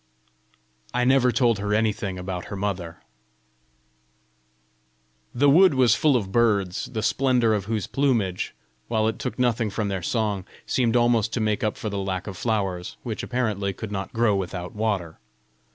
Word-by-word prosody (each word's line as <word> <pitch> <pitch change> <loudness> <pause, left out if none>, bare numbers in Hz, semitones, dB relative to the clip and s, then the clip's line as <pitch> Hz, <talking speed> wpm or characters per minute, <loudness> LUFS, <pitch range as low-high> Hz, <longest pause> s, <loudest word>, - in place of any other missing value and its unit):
I 125 - +2
never 130 -1 +4
told 120 -4 +2
her 105 +1 0
anything 105 -3 -1
about 90 -1 -5
her - - -6
mother. 95 -4 -4 2.3
The 140 +4 +2
wood 170 +2 +6
was 125 -4 +5
full 145 +3 +3
of 100 -5 -4
birds, 100 -5 +1
the 110 -3 -3
splendour 125 -1 +2
of 100 -3 -1
whose 110 -2 -2
plumage, 115 -10 0 0.3
while 110 -2 +1
it 110 - -2
took 110 - -4
nothing 120 -3 +1
from 105 +1 -2
their 95 -2 -2
song, 105 0 -1 0.2
seemed 120 -2 +1
almost 120 -2 +2
to - - 0
make 105 -1 0
up 110 - -1
for 110 - -4
the 100 - -2
lack 95 -1 -3
of 100 - -6
flowers 95 -4 -2
which, 115 -4 -4
apparently, 105 -6 -1
could 110 +2 -7
not 95 -1 -4
grow 115 -3 +2
without 90 -2 -4
water. 100 -7 -2
110 Hz, 165 wpm, -24 LUFS, 95-120 Hz, 2.3 s, wood